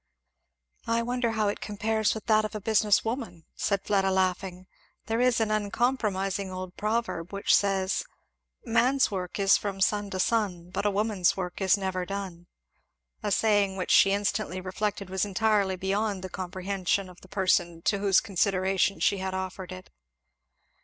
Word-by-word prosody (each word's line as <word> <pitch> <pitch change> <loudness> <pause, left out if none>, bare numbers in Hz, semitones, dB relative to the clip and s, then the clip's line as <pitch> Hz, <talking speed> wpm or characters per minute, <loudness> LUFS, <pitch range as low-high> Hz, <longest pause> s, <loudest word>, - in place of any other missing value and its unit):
"I 230 0 +1
wonder 245 -1 -1
how 215 -1 +1
it 205 - -2
compares 215 +1 0
with 220 - -7
that 215 -1 +4
of 215 0 -5
a - - -2
business 210 0 +2
woman," 205 - -4
said 200 -2 -1
Fleda 195 -2 +2
laughing. 185 -1 -1 0.4
"There 225 +2 0
is 250 -2 +3
an 220 -1 0
uncompromising 205 -3 0
old 185 0 -6
proverb 215 -6 -2
which 200 0 +1
says 195 - +1 0.6
'Man's 245 +3 +2
work 180 -2 -4
is 195 -1 +5
from 200 -2 -4
sun 205 +1 +1
to 190 -1 -4
sun 185 -5 0
But 200 +2 -1
a - - +4
woman's 205 -3 +1
work 180 0 -4
is 190 +1 +4
never 190 -2 -2
done.'" 185 -3 -6 0.7
A 210 - -2
saying 205 -3 +2
which 180 - -2
she 195 - +6
instantly 200 -1 -1
reflected 195 +1 -3
was 190 -1 0
entirely 205 -1 +1
beyond 195 +1 -1
the 185 - -5
comprehension 185 +1 -2
of 180 -1 -15
the - - -15
person 175 -3 0
to 200 - +1
whose 195 -2 +4
consideration 195 0 +1
she 200 - +2
had 190 0 -3
offered 190 0 -5
it. 185 - -10
195 Hz, 165 wpm, -27 LUFS, 185-215 Hz, 0.7 s, she